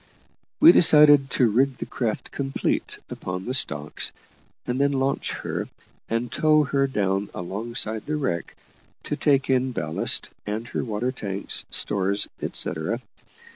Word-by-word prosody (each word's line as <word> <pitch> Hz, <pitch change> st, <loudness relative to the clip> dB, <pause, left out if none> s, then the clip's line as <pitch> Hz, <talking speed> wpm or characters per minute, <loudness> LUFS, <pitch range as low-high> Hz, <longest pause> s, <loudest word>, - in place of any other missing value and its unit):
We 320 Hz, +3 st, +10 dB
decided 150 Hz, -, +7 dB
to 125 Hz, -1 st, +3 dB
rig 130 Hz, +4 st, +1 dB
the -, -, -5 dB
craft 115 Hz, -4 st, -3 dB
complete 135 Hz, -1 st, -2 dB
upon 90 Hz, +1 st, -5 dB
the 125 Hz, -, -3 dB
stocks, 75 Hz, -, -1 dB, 0.5 s
and 125 Hz, +2 st, -1 dB
then 140 Hz, 0 st, +2 dB
launch 135 Hz, 0 st, -1 dB
her, -, -, -4 dB, 0.4 s
and 115 Hz, +1 st, -2 dB
tow 155 Hz, -1 st, +3 dB
her 140 Hz, -1 st, +1 dB
down 100 Hz, -5 st, -1 dB
alongside 110 Hz, +4 st, -3 dB
the 155 Hz, -, -1 dB
wreck, 110 Hz, -, -3 dB, 0.5 s
to -, -, -3 dB
take 140 Hz, -2 st, +2 dB
in 130 Hz, -1 st, +1 dB
ballast, 80 Hz, -7 st, -1 dB
and 110 Hz, +3 st, -4 dB
her -, -, -2 dB
water 115 Hz, +2 st, -2 dB
tanks, 100 Hz, -6 st, -2 dB
stores, 100 Hz, 0 st, 0 dB
etcetera. 95 Hz, +9 st, 0 dB
125 Hz, 135 wpm, -24 LUFS, 100-135 Hz, 0.5 s, We